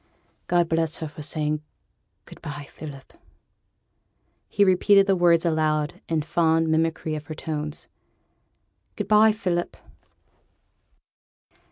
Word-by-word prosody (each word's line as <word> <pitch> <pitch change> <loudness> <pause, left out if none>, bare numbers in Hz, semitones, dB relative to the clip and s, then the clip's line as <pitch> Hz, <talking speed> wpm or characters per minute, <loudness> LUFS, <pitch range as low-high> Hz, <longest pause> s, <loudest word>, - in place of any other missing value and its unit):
God 175 -1 +2
bless 165 -1 0
her 160 - -5
for 150 +1 -10
saying, 150 0 -2 0.6
"Good - - -14
by, 145 -1 -7
Philip."' 140 -4 -10 1.4
He 205 - +2
repeated 195 +1 +5
the 195 -1 +2
words 175 -1 +3
aloud 155 -2 0
in 160 -2 0
fond 165 0 +1
mimicry 160 0 0
of 150 -1 -6
her 155 - -6
tones: 150 -1 -5 1.1
'Good 205 - -4
by, 215 +1 +6
Philip.' 180 -5 -2
160 Hz, 115 wpm, -24 LUFS, 155-175 Hz, 1.4 s, by